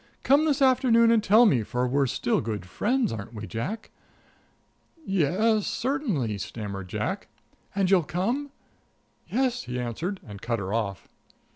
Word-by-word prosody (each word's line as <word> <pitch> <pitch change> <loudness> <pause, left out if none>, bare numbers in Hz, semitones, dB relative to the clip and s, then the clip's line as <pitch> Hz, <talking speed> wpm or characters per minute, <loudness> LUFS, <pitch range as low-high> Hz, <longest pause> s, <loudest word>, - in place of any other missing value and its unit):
Come 285 +4 +4
this 285 -3 +2
afternoon 245 -3 +5
and 225 -2 +3
tell 220 +4 +6
me, 135 - +4
for 125 +4 -1
we're 140 +2 +2
still 120 -1 0
good 105 -4 -4
friends, 235 - 0
aren't 110 +1 -7
we, 105 0 -6
Jack?" 125 - -5 1.1
"Yes 195 +5 +2
certainly," 210 - -1
stammered 100 -2 -6
Jack. - - -3 0.5
"And 195 -1 +1
you'll 190 -2 +6
come?" 200 - -2 0.8
"Yes," 250 0 0
he 125 0 -4
answered, 160 - -3
and 100 -2 -9
cut 115 -1 -1
her 100 -1 -4
off. 100 -6 -2
180 Hz, 145 wpm, -26 LUFS, -, 1.1 s, tell